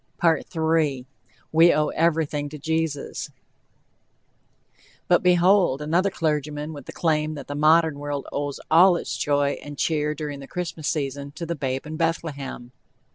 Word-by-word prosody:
"WE 160 -4 +1 0.7
OWE 150 0 +1
EVERYTHING 155 -3 0
TO 150 - -8
JESUS" 160 -1 -2 1.8
But, 175 - +4
behold! 180 -4 +4
another 170 +6 +1
clergyman 150 -3 -2
with 145 -3 -10
the - - -6
claim 155 -2 0
that 145 - -7
the 145 - -4
modern 155 0 +3
world 145 -1 -4
owes 145 -1 -3
all 175 +3 +7
its - - -3
joy 145 -1 0
and 145 -1 -9
cheer, 150 -1 0
during 150 -2 -5
the 135 - -10
Christmas 165 -4 -4
season, 140 -2 -2
"to 170 - -6
the 170 - -2
babe 135 -3 -3
in 155 +1 -6
Bethlehem." 140 -7 -3
150 Hz, 140 wpm, -24 LUFS, 145-165 Hz, 1.8 s, all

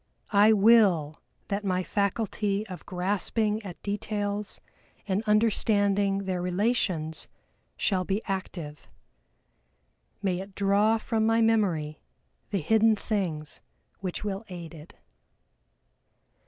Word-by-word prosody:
I 205 +2 +6
will 195 -8 +4 0.3
that 200 +1 -1
my 185 -2 0
faculty 205 +1 -1
of 185 -4 -10
grasping 205 +3 0
at 190 -5 -9
details 205 0 -3 0.5
and 195 +1 0
understanding 205 -2 +2
their 185 -2 -2
relations 180 -4 -1 0.5
shall 185 -3 +1
be 195 +3 -1
active. 175 -6 -5 1.4
May 185 -2 0
it 195 0 -9
draw 205 +3 +3
from 220 0 0
my 225 0 +3
memory 190 -10 +1 0.5
the 200 -4 -1
hidden 220 +6 +4
things 175 -9 -3 0.4
which 185 0 -4
will 200 0 -3
aid 170 -2 -8
it!" 155 0 -13
200 Hz, 105 wpm, -27 LUFS, 180-215 Hz, 1.4 s, I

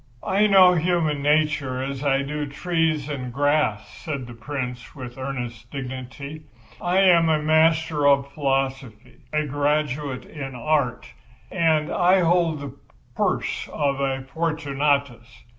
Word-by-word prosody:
"I 205 +2 +3
know 190 -3 +7
human 165 -4 +1
nature 145 -3 +1
as 135 +1 -4
I 140 -1 +2
do 150 +1 -3
the - - -11
trees 160 -2 0
and 130 -4 -5
grass," 145 -5 +1
said 140 -6 -5
the 120 - -10
Prince, 125 +1 -6
with 125 -3 -8
earnest 125 -4 -6
dignity. 135 +2 -7 0.4
"I 180 +2 +2
am 170 -4 +5
a 155 - +3
master 155 -1 +3
of 140 0 +3
philosophy, 135 -5 -2
a 155 0 0
graduate 145 -1 -1
in 135 -4 -7
art, 140 -1 0 0.5
and 160 -4 +1
I 180 +2 +4
hold 170 -3 +2
the 140 -2 -7 0.4
purse - - -1
of 140 -2 -1
a 135 -1 -1
Fortunatus. 140 -5 -2
145 Hz, 135 wpm, -23 LUFS, 135-155 Hz, 0.5 s, know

